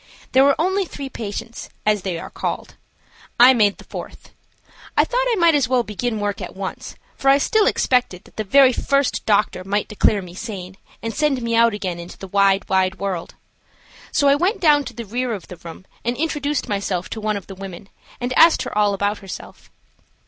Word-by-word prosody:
There 265 - +5
were 280 0 +4
only 380 +4 +1
three 280 -5 -7
patients, 230 0 -6 0.2
as 210 -1 +2
they 180 -2 -3
are - - -8
called. - - -4 0.7
I 250 +2 +9
made 210 -5 +2
the - - -13
fourth. - - -9 0.7
I - - +6
thought - - 0
I 470 - +2
might 340 -4 +4
as 285 -4 +2
well 255 -2 +2
begin 220 +1 -3
work 205 +1 -2
at 180 - -7
once, 190 0 -6 0.2
for 270 - +1
I 275 - +7
still 430 - +2
expected 250 -8 +1
that - - -20
the 215 - -2
very 260 +5 +5
first 275 +2 0
doctor 205 -3 +2
might 200 +2 -1
declare 205 -1 +1
me 175 -1 -11
sane 190 -2 -7 0.3
and 225 0 -3
send 285 -3 0
me 230 0 0
out 230 -1 +4
again 185 -4 -4
into 170 +1 -10
the 195 - -9
wide, 195 0 +2
wide 190 0 +1
world. 190 -4 -4 0.8
So 285 - +2
I 280 - +6
went 360 +10 +1
down 295 -4 +4
to 250 - -7
the 235 - -6
rear 245 +3 -2
of 195 -5 -7
the 180 - -9
room 170 +2 -11 0.2
and 240 +1 -1
introduced 295 -2 -1
myself 195 -3 -2
to 220 - -5
one 215 -1 -1
of 200 - -9
the 195 - -9
women, 195 0 -9 0.3
and 245 +1 -2
asked 330 0 +6
her - - -6
all 205 -1 +2
about 205 +1 -1
herself. 195 -2 -10
215 Hz, 205 wpm, -21 LUFS, 195-275 Hz, 0.8 s, I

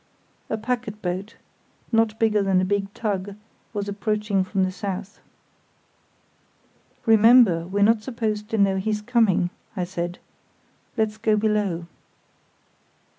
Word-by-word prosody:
A 220 - -1
packet 220 -2 -3
boat, 185 +4 -3 0.6
not 225 -1 +2
bigger 220 -2 +2
than 195 -2 +2
a 185 - +1
big 200 0 -1
tug, 200 -2 -3 0.4
was 205 -2 -3
approaching 205 -1 0
from 190 +1 0
the 185 - 0
south. 195 +1 -5 1.9
"Remember, 220 -6 +6
we're 200 +2 +1
not 220 +1 +4
supposed 215 -3 -3
to 225 - -1
know 195 -2 +3
he's 210 +2 -2
coming," 210 -7 +2 0.3
I 180 - 0
said; 175 -1 -4 0.8
"let's 220 -1 0
go 215 -1 +2
below." 205 -5 0
210 Hz, 125 wpm, -24 LUFS, 190-220 Hz, 1.9 s, Remember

